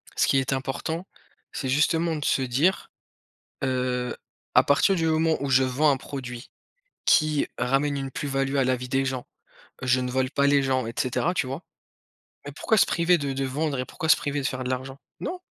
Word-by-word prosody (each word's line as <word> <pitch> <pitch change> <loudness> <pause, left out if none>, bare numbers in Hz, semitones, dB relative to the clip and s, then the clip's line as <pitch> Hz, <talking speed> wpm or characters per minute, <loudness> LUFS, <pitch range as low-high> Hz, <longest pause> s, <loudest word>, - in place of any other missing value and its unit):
Ce - - +2
qui - - +3
est 135 +1 -1
important, 145 +6 -3 0.5
c'est 135 - -4
justement 160 +4 +2
de 150 - -4
se - - +2
dire, 135 +9 +1 0.7
heu: 125 -1 -1 0.4
«À - - +7
partir 145 +7 +3
du 165 -2 0
moment 160 0 +2
où 140 - -2
je 130 0 +5
vends 135 +4 +3
un 135 - +1
produit 125 -2 -7 0.6
qui 155 -2 +3
ramène 135 +3 +1
une 135 -1 -4
plus-value 135 0 -2
à 135 - +3
la 130 0 +2
vie 125 +1 -7
des 135 +1 +1
gens, 130 -2 -3 0.6
heu, - - -3
je 130 0 +4
ne 125 0 -2
vole 130 0 0
pas 140 -1 +2
les 140 -1 +4
gens», 130 -3 0
et 115 - -5
cetera, 140 +7 0
tu 150 - -1
vois? 135 +7 -5 0.8
Mais - - -7
pourquoi 220 - +1
se - - +5
priver 175 +1 +3
de 140 -2 -2
de 135 0 -2
vendre 140 +1 -2
et 125 - -1
pourquoi 160 +4 -5
se - - +7
priver 145 0 -2
de 135 - -1
faire 130 -1 -3
de 125 - -3
l'argent? 130 +1 -4 0.2
Non! 365 - -4
135 Hz, 215 wpm, -25 LUFS, 130-150 Hz, 0.8 s, À